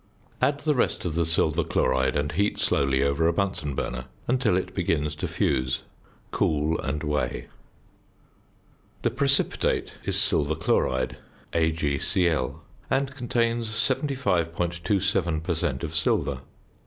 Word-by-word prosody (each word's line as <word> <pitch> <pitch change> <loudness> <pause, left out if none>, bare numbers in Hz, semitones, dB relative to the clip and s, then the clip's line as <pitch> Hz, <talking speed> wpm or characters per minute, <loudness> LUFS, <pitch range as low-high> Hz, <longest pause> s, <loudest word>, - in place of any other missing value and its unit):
Add 140 +3 +2
the 150 0 +2
rest 125 - 0
of 85 - -1
the 85 +1 +1
silver 80 0 +2
chloride 65 -1 +1
and 75 0 0
heat 100 +2 0
slowly 70 -1 +2
over 70 +4 +2
a 85 - +3
Bunsen 80 -7 -1
burner 65 0 -3 0.2
until 120 -6 +2
it 90 0 -3
begins 80 -5 0
to - - -2
fuse. 65 -2 0 0.5
Cool 75 +1 +1
and 75 +2 -3
weigh. 75 -1 -2 1.5
The - - +2
precipitate - - +1
is - - 0
silver 75 +1 +2
chloride 65 -1 0 0.4
(AgCl) 80 -1 +1 0.3
and 135 0 0
contains 115 -2 0
75.27 95 - 0
per 85 - 0
cent. 70 -4 -2
of 80 -1 -4
silver. 75 -1 +1
80 Hz, 125 wpm, -26 LUFS, 75-100 Hz, 1.5 s, a